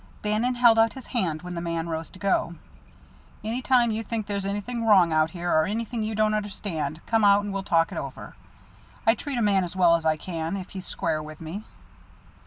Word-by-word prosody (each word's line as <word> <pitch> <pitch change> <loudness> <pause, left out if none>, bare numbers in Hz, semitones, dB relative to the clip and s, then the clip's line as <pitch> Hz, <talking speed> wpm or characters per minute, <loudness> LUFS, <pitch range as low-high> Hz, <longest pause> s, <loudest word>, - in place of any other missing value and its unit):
Bannon 215 +4 +1
held 235 -2 +6
out 225 -1 +4
his 265 - -10
hand 180 - -1
when 180 0 -6
the 170 - -4
man 170 -1 -2
rose 160 0 -4
to - - -14
go. 185 -3 0 0.9
"Any 230 +4 -2
time 245 -2 +3
you 220 +1 -2
think 225 -1 -3
there's 200 -1 -2
something 205 +5 -3
wrong 190 -7 +5
out 155 0 +3
here, 175 +1 -3
or 155 0 +4
anything 225 +2 -3
you 215 0 -2
don't 215 0 +2
understand, 190 -8 -3
come 225 -1 +2
out 200 0 +5
and 205 -1 -4
we'll 195 - -2
talk 165 -4 +2
it - - -3
over. - - -8 0.7
I 225 - +6
treat 275 +2 -5
a 235 - +1
man 200 -2 +3
as 175 +1 -5
well 175 -2 +5
as 165 - -2
I 160 -1 +2
can, 165 +2 -4
if 185 -1 -7
he's 190 -1 -7
square 160 -2 -1
with 155 0 -10
me." 170 +7 -7
200 Hz, 220 wpm, -26 LUFS, 170-220 Hz, 0.9 s, held